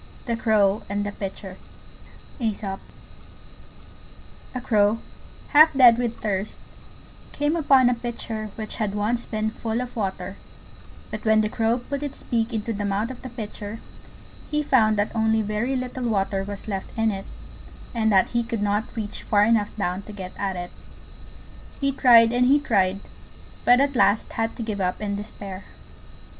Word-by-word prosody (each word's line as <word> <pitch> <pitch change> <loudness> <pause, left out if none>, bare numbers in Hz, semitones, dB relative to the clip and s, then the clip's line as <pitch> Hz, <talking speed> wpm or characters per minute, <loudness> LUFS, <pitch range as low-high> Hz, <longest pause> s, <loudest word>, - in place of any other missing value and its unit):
THE 235 -2 0
CROW 215 -3 +2
AND 205 0 -1
THE 205 - -3
PITCHER 195 -1 -7 0.8
A 210 -4 -2 1.8
crow, 210 -2 +3 0.5
half 310 +2 +7
dead 245 -3 +7
with 235 -2 -1
thirst, 205 -1 -3 0.7
came 290 +2 0
upon 275 -6 +5
a 250 - +4
Pitcher 230 -2 -5
which 215 -1 -6
had 210 -2 -1
once 225 +3 0
been 215 0 -2
full 225 +1 -3
of 250 0 -5
water; 190 -3 -3 0.7
but - - -5
when 220 -1 +4
the 215 - 0
Crow 225 +2 +1
put 275 +3 -5
its 285 -2 -6
beak 230 0 -1
into 225 0 -2
the 205 0 -3
mouth 205 +4 -1
of 255 - -10
the 255 - -7
Pitcher 215 -2 -7 0.7
he 300 0 0
found 220 -6 +3
that 205 +3 -1
only 220 0 +2
very 215 +6 -1
little 255 -1 -3
water 195 -2 0
was 200 +1 -7
left 195 0 -5
in 225 0 +2
it, 195 -1 -5 0.7
and 220 -2 +1
that 190 -2 +4
he 235 - +1
could 230 -3 -3
not 210 +4 -1
reach 210 -2 -5
far 205 -1 +3
enough 215 -1 +3
down 185 -2 -1
to 210 - -11
get 190 -3 -7
at 195 -2 -2
it. 175 0 -6 1.1
He 275 -1 +1
tried, 235 -4 +6
and 245 +1 +3
he 285 +3 +5
tried, 200 -8 +1 0.6
but 245 +1 +6
at 280 0 +1
last 215 -2 +3
had 225 0 -2
to 235 - -4
give 210 -3 -3
up 180 0 -1
in 205 -1 -2
despair. 200 -2 -8
220 Hz, 165 wpm, -24 LUFS, 205-240 Hz, 1.8 s, half